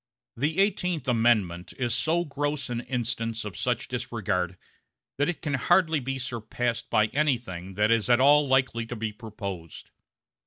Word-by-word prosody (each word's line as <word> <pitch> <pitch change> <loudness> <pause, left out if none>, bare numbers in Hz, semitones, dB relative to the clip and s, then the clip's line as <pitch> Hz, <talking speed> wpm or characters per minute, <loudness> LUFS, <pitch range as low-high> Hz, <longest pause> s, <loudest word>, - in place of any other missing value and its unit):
The 150 +7 -1
Eighteenth 180 -7 +1
Amendment 110 -8 +2
is 120 -3 0
so 160 +8 +1
gross 145 -2 -2
an 120 0 -2
instance 115 -3 -3
of 100 -4 -6
such - - -1
disregard 90 0 -2 0.6
that 145 - +2
it 175 - -4
can 145 -3 -1
hardly 165 +3 +3
be 135 +1 -3
surpassed 120 -1 -3
by 110 - +4
anything 120 - -1
that 105 +2 +3
is 115 0 +2
at 120 0 +5
all 145 +2 +6
likely 130 -3 +1
to 120 - -5
be 110 -1 -3
proposed. 100 -7 -7
120 Hz, 155 wpm, -27 LUFS, 110-145 Hz, 0.6 s, all